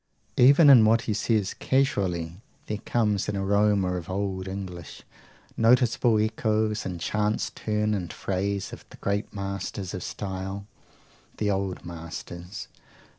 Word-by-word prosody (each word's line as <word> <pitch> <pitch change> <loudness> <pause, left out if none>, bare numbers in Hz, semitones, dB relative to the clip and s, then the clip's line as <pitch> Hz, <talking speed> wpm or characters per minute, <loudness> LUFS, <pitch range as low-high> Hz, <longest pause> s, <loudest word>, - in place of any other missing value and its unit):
Even 140 +4 +8
in 120 -5 +9
what 115 +2 +4
he 115 -3 -2
says 105 -2 0
casually 95 -10 0 0.2
there 105 -1 -3
comes 105 -5 0
an 100 - -1
aroma 100 -1 +2
of 85 -1 -7
old 95 -1 -2
English; 95 -4 -7 0.5
noticeable 120 -1 +4
echoes, 110 0 0
in 90 -2 -4
chance 105 +5 -1
turn 105 0 -1
and 90 -5 -3
phrase, 100 +1 -2
of - - -9
the - - -13
great 100 +1 -2
masters 100 -1 -4
of 95 - -4
style, 95 0 -5 0.7
the 105 -1 +1
old 95 -1 -2
masters. 85 +2 -7
100 Hz, 130 wpm, -26 LUFS, 95-110 Hz, 0.7 s, in